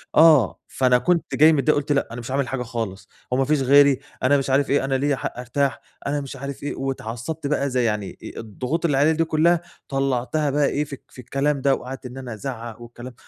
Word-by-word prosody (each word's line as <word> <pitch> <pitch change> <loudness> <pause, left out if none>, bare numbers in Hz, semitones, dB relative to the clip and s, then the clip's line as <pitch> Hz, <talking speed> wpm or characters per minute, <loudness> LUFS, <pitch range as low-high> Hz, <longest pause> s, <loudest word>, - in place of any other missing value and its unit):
آه، 155 - +6
فأنا 125 -1 +3
كنت 170 +6 0
جاي 155 +2 +6
متضايق، 150 +1 +2
قُلت 145 +1 -4
لأ، 140 - +2
أنا 120 - -6
مش 120 +2 -7
عامل 135 -1 0
حاجة 125 -1 -3
خالص، 115 -5 -5 0.3
هو - - +2
ما 135 - +2
فيش 150 0 +1
غيري، 140 0 +5 0.2
أنا 140 +3 +4
مش 135 0 -2
عارف 135 +1 +2
إيه، 140 0 +2
أنا 135 0 0
ليّا 140 +1 +1
حق 135 - -5
أرتاح، 135 +3 -1 0.3
أنا 145 +1 -1
مش 140 0 -7
عارف 140 +1 -7
إيه، 145 - -3
وأتعصّبت 135 +3 -4
بقى، 140 -1 0
زي 125 -1 +1
يعني 105 -4 -2
أ-أ - - -9
الضغُوط 125 - -3
اللي 145 -5 +2
عليّا 145 +3 +4
دي 160 +1 +2
كُلّها 165 +2 +3 0.3
طلّعتها 135 +2 0
بقى 145 +1 +2
إيه 150 - 0
في 145 - -9
الك 135 - -12
الكلام 140 +3 -1
ده، 135 0 +3
وقعدت 130 +1 -8
إن 125 +1 -8
أنا 130 -3 -6
أزعق 120 -1 -6
والكلام 120 +1 -10
135 Hz, 225 wpm, -23 LUFS, 125-145 Hz, 0.3 s, آه